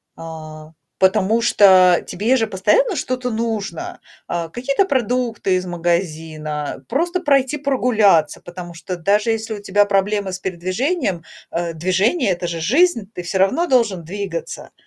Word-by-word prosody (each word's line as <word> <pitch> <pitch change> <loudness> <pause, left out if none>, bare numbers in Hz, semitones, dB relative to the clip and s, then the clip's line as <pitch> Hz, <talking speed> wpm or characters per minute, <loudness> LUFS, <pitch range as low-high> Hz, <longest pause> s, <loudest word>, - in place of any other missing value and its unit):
А, 155 -1 -9 0.3
потому 195 +4 +2
что 185 -5 +5
тебе 230 +8 +1
же 225 -2 0
постоянно 380 - +2
что-то 255 -3 -2
нужно: 220 -6 -4 0.3
а, 170 -1 -3
какие-то 275 - 0
продукты 240 - 0
из 185 - -4
магазина, 160 -4 -3
просто 345 +7 0
пройти 280 -3 +2
прогуляться, 220 - +2
потому 175 -1 -9
что 170 +2 -6
даже 205 +5 +1
если 225 0 -2
у 205 - -7
тебя 205 +1 +2
проблемы 200 -1 0
с 185 - -5
передвижением, 185 - -2 0.3
э, 170 0 -2
движение- 190 - +1
это 175 0 -2
же 165 -1 -4
жизнь, 230 - +2
ты 180 - -5
всё 175 +2 -3
равно 260 - +2
должен 225 - +2
двигаться. 185 -1 -6
195 Hz, 140 wpm, -20 LUFS, 175-240 Hz, 0.3 s, что